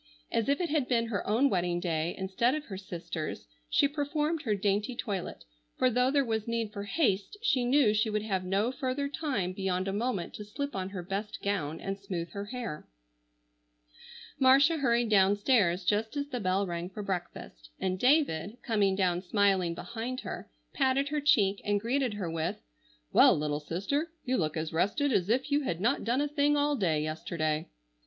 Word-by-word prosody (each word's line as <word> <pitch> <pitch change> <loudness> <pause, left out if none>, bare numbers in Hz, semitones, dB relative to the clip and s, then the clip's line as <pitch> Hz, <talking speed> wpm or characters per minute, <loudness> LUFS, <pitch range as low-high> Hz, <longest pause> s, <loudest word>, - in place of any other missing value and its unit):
As 230 - 0
if 280 - +2
it 350 -2 -1
had 295 -5 +1
been 230 -2 +1
her 205 -4 -2
own 230 +7 +4
wedding 175 -6 0
day 170 -1 -1
instead 195 +8 +1
of 305 - -5
her 195 - -7
sister's, 170 -4 -5 0.2
she 285 - +4
performed 300 +2 -1
her 220 -8 0
dainty 205 +4 0
toilet, 200 -7 -4 0.3
for 255 - +3
though 250 +2 +3
there 280 0 +2
was 220 -2 -2
need 230 -2 -2
for 200 -2 -5
haste, 205 - 0
she 260 - +2
knew 250 -4 +4
she 215 +1 +1
would 210 0 -1
have 190 -4 -1
no 195 +6 +1
further 265 +2 -2
time 275 - -2
beyond 190 -1 -1
a 195 - -1
moment 210 -4 -2
to 210 - -7
slip 280 +7 -5
on 190 -1 -3
her 190 -3 -6
best 200 +4 -4
gown 170 -7 -1
and 195 0 -4
smooth 180 -4 -5
her 200 0 -5
hair. 230 -8 -6 1.5
Marcia 275 +5 +6
hurried 240 -4 +2
downstairs 200 -2 +3
just 220 +7 0
as 285 0 -2
the 250 -3 -3
bell 190 0 +1
rang 175 0 -4
for 205 +2 -7
breakfast, 175 - -5
and 185 0 -1
David, 245 - +2
coming 205 -5 +2
down 180 -2 +1
smiling 190 -3 +2
behind 235 +6 -5
her, - - -7 0.2
patted 275 0 +2
her 300 0 -1
cheek 210 -10 +3
and 205 0 +1
greeted 245 +1 0
her 195 -4 -3
with, 165 0 -2 0.5
"Well, - - +7
little 150 0 -1
sister, 200 - -2 0.2
you 255 0 +1
look 155 -2 -1
as 160 0 -3
rested 240 - +1
as 185 -1 +1
if 260 +5 +1
you 290 +1 +3
had 175 - -2
not 240 +8 +1
done 245 +4 +1
a 295 - +1
thing 295 0 +2
all 290 0 +2
day 160 - +1
yesterday." 155 0 -2
210 Hz, 190 wpm, -30 LUFS, 185-260 Hz, 1.5 s, Well